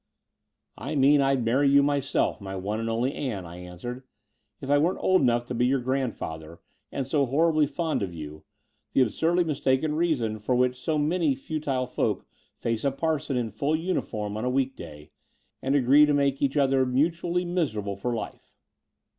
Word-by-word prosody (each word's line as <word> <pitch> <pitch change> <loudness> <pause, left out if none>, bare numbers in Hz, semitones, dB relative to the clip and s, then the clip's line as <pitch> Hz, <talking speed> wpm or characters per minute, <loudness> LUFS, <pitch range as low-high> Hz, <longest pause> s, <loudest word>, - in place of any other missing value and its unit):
"I 140 +7 -4
mean 140 +1 +5
I'd 135 -3 +1
marry 135 +5 +3
you 140 0 +5
myself, 140 -5 0
my 95 -1 -6
one 100 +3 -3
and 115 0 -2
only 120 +4 0
Ann," 110 -10 -4
I 85 +1 -10
answered, 90 +8 -7 0.6
'*if - - -8
I 145 +1 +4
weren't 170 +5 +1
old 185 0 +3
enough 120 -2 +2
to 125 - -5
be 125 +1 +2
your 135 +1 +2
grandfather 115 - -3 0.3
and 135 - -3
so 140 0 +1
horribly 155 +2 +3
fond 155 +1 -2
of 95 -3 -2
you 75 -2 -9 0.2
— - - -47
the - - +4
absurdly 165 +9 +2
mistaken 145 -1 0
reason 140 -10 0
for 125 +4 0
which 125 0 +2
so 155 +4 -2
many 155 -1 +1
futile 140 -2 -2
folk 125 - -2 0.3
face 115 -1 -2
a 140 - +3
parson 145 -1 -1
in 115 -3 -2
full 140 +9 0
tmif 175 +4 -2
orm 105 -1 -3
on 110 - -4
a 125 - 0
week 135 0 0
day, 75 -1 -11 0.5
and 135 +2 0
agree 140 +3 +6
to 145 - +2
make 140 -1 +1
each 140 +1 +1
other 135 -2 +3
mutually 170 +7 0
miserable 110 - -2
for 110 +6 -3
lif - - -4
e. - - -37
135 Hz, 190 wpm, -26 LUFS, 115-150 Hz, 0.6 s, agree